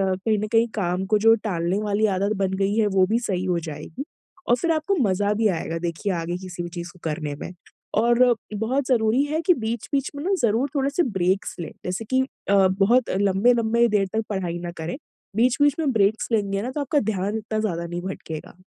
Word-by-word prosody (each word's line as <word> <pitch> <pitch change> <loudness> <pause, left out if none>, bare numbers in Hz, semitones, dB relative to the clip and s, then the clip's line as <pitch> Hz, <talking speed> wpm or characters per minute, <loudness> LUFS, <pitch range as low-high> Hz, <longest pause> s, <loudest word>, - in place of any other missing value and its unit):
कहीं 215 +3 0
न 215 - -2
कहीं 230 +1 +4
काम 185 -2 -1
को 215 - +3
जो 225 +2 +6
टालने 175 -2 0
वाली 210 +1 +1
आदत 200 +3 +1
बन 190 -1 0
गयी 200 +2 0
है 215 - +3
वो 185 - +6
भी 225 +4 +1
सही 190 -6 -2
हो 180 -2 +1
जाएगी। 160 - -7 0.5
और 240 - +6
फिर 335 +7 0
आपको 315 +6 0
मज़ा 205 0 +1
भी 220 +1 +2
आएगा 165 -1 -2
देखिए 170 +4 -2
आगे 175 +1 -2
किसी 180 -2 -6
भी 175 - -5
चीज़ 175 0 -7
को 180 - -19
करने 150 -2 -3
में। - - -6 0.5
और 240 +1 +4 0.2
बहुत 250 +6 0
ज़रूरी 240 +1 +3
है 310 +2 -1
कि 360 +2 +4
बीच-बीच 240 +2 -2
में 285 - -5
ना 390 - +1
ज़रूर 235 +5 +2
थोड़े 275 -1 +1
से 345 +5 +2
ब्रेक्स 190 - 0
लें। 170 - -5
जैसे 185 +5 -3
कि 260 +4 +2 0.3
अ, 195 -1 +5
बहुत 200 +7 +2
लंबे-लंबे 225 +4 +3
देर 205 -2 +2
तक 220 0 0
पढ़ाई 180 -4 -2
ना 175 0 -5
करें। 165 +9 -4 0.4
बीच-बीच 255 +4 +3
में 300 -4 +1
ब्रेक्स 210 0 +2
लेंगे 200 -2 +1
ना 250 - -3
तो 295 - -3
आपका 285 +1 +1
ध्यान 200 +3 -2
इतना 215 0 -3
ज़्यादा 170 -6 -2
नहीं 175 +1 -4
भटकेगा। 170 -3 -7
205 Hz, 210 wpm, -24 LUFS, 185-235 Hz, 0.5 s, जो